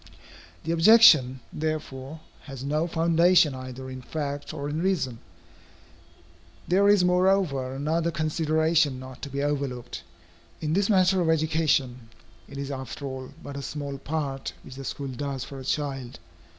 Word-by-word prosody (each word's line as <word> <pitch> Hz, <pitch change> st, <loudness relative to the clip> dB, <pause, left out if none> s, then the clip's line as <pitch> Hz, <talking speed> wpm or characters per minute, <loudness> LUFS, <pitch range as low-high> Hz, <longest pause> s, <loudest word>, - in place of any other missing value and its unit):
The 165 Hz, -, -2 dB
objection, 165 Hz, -, +6 dB
therefore, 155 Hz, -1 st, -4 dB, 0.2 s
has 135 Hz, -3 st, -8 dB
no 150 Hz, +4 st, 0 dB
foundation 170 Hz, -1 st, +4 dB
either 130 Hz, 0 st, -7 dB
in 130 Hz, 0 st, -7 dB
fact 145 Hz, +1 st, -4 dB
or 140 Hz, -, -5 dB
in 150 Hz, +2 st, -2 dB
reason. 140 Hz, -11 st, -1 dB, 1.5 s
There 195 Hz, +3 st, +4 dB
is 205 Hz, -3 st, +5 dB
moreover 180 Hz, -8 st, +2 dB
another 160 Hz, +4 st, 0 dB
consideration 155 Hz, -2 st, +1 dB
not 130 Hz, 0 st, -10 dB
to 140 Hz, -, -6 dB
be 140 Hz, +1 st, -3 dB
overlooked. 140 Hz, -4 st, -3 dB, 0.6 s
In 155 Hz, 0 st, -2 dB
this 200 Hz, +3 st, +1 dB
matter 190 Hz, -2 st, +4 dB
of 165 Hz, -, +1 dB
education, 150 Hz, -7 st, +1 dB, 0.4 s
it 140 Hz, -, -9 dB
is 140 Hz, 0 st, -4 dB
after 130 Hz, +1 st, -6 dB
all 130 Hz, -1 st, -6 dB
but 140 Hz, -, -7 dB
a 140 Hz, -, -4 dB
small 140 Hz, 0 st, -5 dB
part 140 Hz, -3 st, -3 dB
which -, -, -11 dB
the 135 Hz, +1 st, -8 dB
school 140 Hz, +1 st, -4 dB
does 135 Hz, 0 st, -4 dB
for 140 Hz, -1 st, -8 dB
a -, -, -8 dB
child. 135 Hz, -3 st, -3 dB
145 Hz, 150 wpm, -26 LUFS, 135-160 Hz, 1.5 s, objection